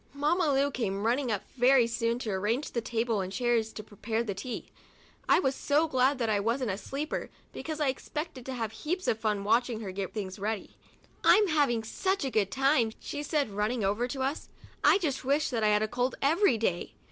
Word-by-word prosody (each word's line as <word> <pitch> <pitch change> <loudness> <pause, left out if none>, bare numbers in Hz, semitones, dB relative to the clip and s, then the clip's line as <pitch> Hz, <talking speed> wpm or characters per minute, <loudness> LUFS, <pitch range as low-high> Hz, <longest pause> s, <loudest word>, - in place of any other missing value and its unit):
Mamma 305 +3 +2
Lu 280 +1 +2
came 200 -5 -2
running 245 +2 +1
up 205 -2 -1
very 250 0 +5
soon 230 0 -1
to 235 -4 -4
arrange 210 +9 -1
the 235 - -1
table 225 -2 -1
and 185 0 -4
the - - -6
chairs 240 -1 +1
and - - -14
to 215 - -6
prepare 220 +2 -3
the 210 -4 -3
tea. 240 +6 -6 0.6
I - - +6
was 265 -6 +1
so 295 +4 +1
glad 260 0 +2
then 240 - 0
that 215 - +2
I 205 - +2
wasn't 230 +2 0
a 190 - -3
"sleeper," 280 +8 -4 0.2
because 315 -1 -5
I 295 -3 +2
expected 300 +1 -5
to 260 - -3
have 225 -3 -3
heaps 355 - -3
of 220 - +1
fun 210 -3 0
watching 230 +2 +1
her 195 -3 -5
get 190 0 -4
things 200 -2 -5
ready. 210 +1 -3 0.5
"I'm 420 -3 +6
having 280 -8 +2
such 380 - -1
a 265 - -2
good 205 -4 +1
time," 265 -2 +2
she 290 - -5
said, 295 -5 0
running 210 +3 -1
over 210 +5 +1
to 265 +2 -4
us, 275 +4 -3 0.3
"I - - +6
just 300 -9 -2
wish 280 +2 +1
I 225 -2 +2
had 210 0 +3
a - - 0
cold 250 +3 -1
every 315 - +4
day." 185 -6 -2
240 Hz, 220 wpm, -29 LUFS, 215-280 Hz, 0.6 s, I